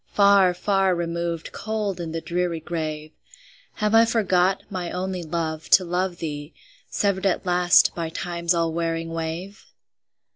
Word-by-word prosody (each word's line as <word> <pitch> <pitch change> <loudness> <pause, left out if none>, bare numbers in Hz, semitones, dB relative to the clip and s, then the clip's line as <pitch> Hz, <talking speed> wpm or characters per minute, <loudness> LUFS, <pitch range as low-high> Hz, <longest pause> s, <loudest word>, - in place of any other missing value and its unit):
Far, 200 -3 +5
far 195 -1 +1
removed, 170 -1 -3
cold 215 -4 -3
in 165 -2 -4
the 165 0 -4
dreary 175 -1 -2
grave! 155 -2 -4 0.6
Have 210 0 -1
I 225 0 +7
forgot, 190 -4 +1
my 180 -3 -4
only 185 0 -3
love, 160 -1 -4
to 185 - -7
love 180 +1 -1
thee, 150 -2 -6 0.3
Severed 200 -1 0
at 190 - -1
last 180 -1 +4
by 165 -2 -3
Time's 170 +1 -2
all 165 -1 0
wearing 165 0 -2
wave? 165 +5 -5
175 Hz, 145 wpm, -24 LUFS, 165-190 Hz, 0.6 s, I